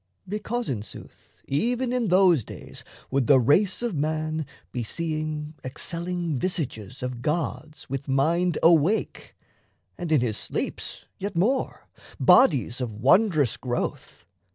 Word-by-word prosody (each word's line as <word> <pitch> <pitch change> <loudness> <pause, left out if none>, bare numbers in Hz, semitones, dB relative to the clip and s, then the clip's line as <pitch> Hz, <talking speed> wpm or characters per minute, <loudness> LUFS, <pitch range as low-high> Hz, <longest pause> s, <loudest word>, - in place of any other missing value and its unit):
Because, 220 +4 -3
in 115 -6 -2
sooth, 105 - -12
Even 245 - 0
in 245 -3 0
those 180 - +5
days - - -9 0.3
would 135 -2 +1
the 140 - +7
race 180 - +3
of 235 -4 -1
man 155 0 -1 0.2
Be 125 - -3
seeing 155 +2 -3
excelling 170 +3 -2
visages 130 - -3
of 125 -1 -4
gods 155 0 -3
With 135 +2 -4
mind 160 +6 +2
awake; 170 +5 +2 0.6
and 175 -3 -4
in 150 -5 +4
his 110 -4 -1
sleeps, - - -4
yet 200 0 -4
more 240 +10 0 0.3
Bodies 135 - +4
of 115 -4 -3
wondrous 150 - +3
growth. 125 -1 -4
155 Hz, 130 wpm, -25 LUFS, 135-180 Hz, 0.6 s, the